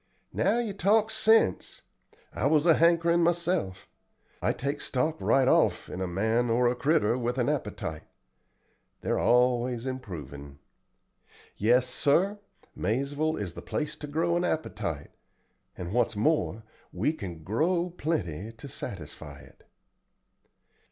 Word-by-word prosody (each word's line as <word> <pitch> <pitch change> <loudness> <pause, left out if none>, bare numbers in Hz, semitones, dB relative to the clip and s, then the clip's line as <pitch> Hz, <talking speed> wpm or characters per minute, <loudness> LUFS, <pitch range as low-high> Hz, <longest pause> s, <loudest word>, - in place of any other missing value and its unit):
"Now - - +2
you 230 -4 -2
talk 210 +3 +2
sense. 220 - +2 0.5
I 125 - 0
was 150 +1 +3
a 165 - +7
hankerin' 170 +1 +3
myself. 170 - 0 0.5
I - - +2
take 140 +2 -3
stock 145 +5 -1
right 135 -1 +3
off - - +2
in 90 - -5
a 95 - -1
man 110 +7 0
or 120 +2 +3
a 120 - +2
critter 125 -3 +1
with 120 +1 -2
an 120 -2 +1
appetite. 80 -1 -3 1.0
They're - - 0
always 125 0 +2
improvin'. 80 - -7 1.0
Yes, 120 +4 +3
sir; 175 +11 +1 0.4
Maizeville 140 - -1
is 95 -5 -4
the - - -8
place 150 - -3
to 150 - -7
grow 165 +4 0
an 175 - +1
appetite, 100 - -3 0.7
and 90 +2 -5
what's 120 -2 +1
more 115 -2 0 0.3
we 155 - 0
can 85 - -8
grow 170 - 0
plenty 110 - -3
to 115 +5 -11
satisfy 85 - -8
it." - - -19
125 Hz, 130 wpm, -28 LUFS, 105-165 Hz, 1.0 s, a